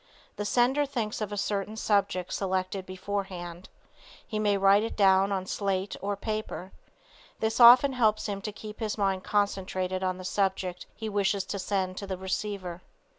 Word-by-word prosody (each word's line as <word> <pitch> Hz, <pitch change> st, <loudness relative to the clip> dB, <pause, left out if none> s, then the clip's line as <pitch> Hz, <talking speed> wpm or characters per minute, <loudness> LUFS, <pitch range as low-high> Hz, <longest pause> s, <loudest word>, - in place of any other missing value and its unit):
The 205 Hz, -, -4 dB
sender 260 Hz, +6 st, +2 dB
thinks 230 Hz, -5 st, -3 dB
of 210 Hz, -1 st, -3 dB
a 205 Hz, -, -4 dB
certain 205 Hz, +1 st, -2 dB
subject 200 Hz, -4 st, 0 dB
selected 190 Hz, 0 st, -2 dB
before 195 Hz, +2 st, -3 dB
hand. 175 Hz, -1 st, -8 dB, 0.6 s
He 215 Hz, -, -3 dB
may 205 Hz, -1 st, +2 dB
write 195 Hz, +1 st, +5 dB
it 225 Hz, -, -3 dB
down 195 Hz, -1 st, +5 dB
on 190 Hz, -1 st, -1 dB
slate 195 Hz, 0 st, -2 dB
or 200 Hz, +1 st, -1 dB
paper. 215 Hz, -3 st, -4 dB, 0.7 s
This 220 Hz, +2 st, -1 dB
often 250 Hz, +3 st, +9 dB
helps 220 Hz, -4 st, +2 dB
him 200 Hz, -2 st, -3 dB
to 210 Hz, -, -4 dB
keep 210 Hz, +1 st, -10 dB
his 220 Hz, -2 st, -2 dB
mind 195 Hz, -2 st, 0 dB
concentrated 190 Hz, -2 st, -1 dB
on 185 Hz, -1 st, 0 dB
the 185 Hz, -, -8 dB
subject 190 Hz, -2 st, -1 dB
he 220 Hz, -, -5 dB
wishes 200 Hz, -1 st, +1 dB
to 200 Hz, +1 st, -5 dB
send 185 Hz, -1 st, -1 dB
to 200 Hz, -, -5 dB
the 190 Hz, -1 st, -3 dB
receiver. 190 Hz, -1 st, -4 dB
200 Hz, 175 wpm, -28 LUFS, 185-215 Hz, 0.7 s, often